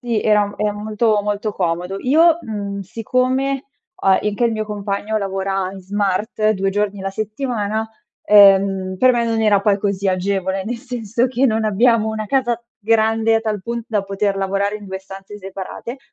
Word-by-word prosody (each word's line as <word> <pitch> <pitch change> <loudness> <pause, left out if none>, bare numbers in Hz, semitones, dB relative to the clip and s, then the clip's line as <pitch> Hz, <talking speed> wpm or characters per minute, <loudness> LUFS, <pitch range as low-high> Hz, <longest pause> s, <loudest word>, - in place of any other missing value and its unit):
sì 235 -3 -1
era 210 -1 +2
è 210 0 0
molto, 215 +1 0
molto 210 +1 -2
comodo. 180 +1 -2
Io, 320 +5 +4
mhmm, 200 -2 -5
siccome 255 +6 -1 0.4
ho - - -2
anche 205 +4 +2
il 230 - +2
mio 215 0 -2
compagno 210 +1 -3
lavora 195 -1 -2
in 195 - -9
smart 205 +2 0
2 195 -1 -1
giorni 205 0 -1
la 195 0 -3
settimana, 215 0 -2 0.4
ehm, 195 -2 +5
per 255 0 +5
me 235 -1 +1
non 225 -1 0
era 205 -2 +4
poi 200 -1 +2
così 200 -1 -1
agevole, 190 0 -1
nel 240 +2 -3
senso 240 -2 -2
che 255 +1 0
non 220 -1 0
abbiamo 220 +1 +3
una 220 0 -3
casa 240 -1 +1 0.2
grande 225 0 +2
a - - 0
tal 215 -3 -2
punto 235 +1 -4
da 205 -3 +1
poter 195 0 -1
lavorare 200 +2 -1
in 205 -1 -12
2 190 0 -5
stanze 195 +1 -11
separate, 195 +6 -7
210 Hz, 175 wpm, -19 LUFS, 195-225 Hz, 0.4 s, ehm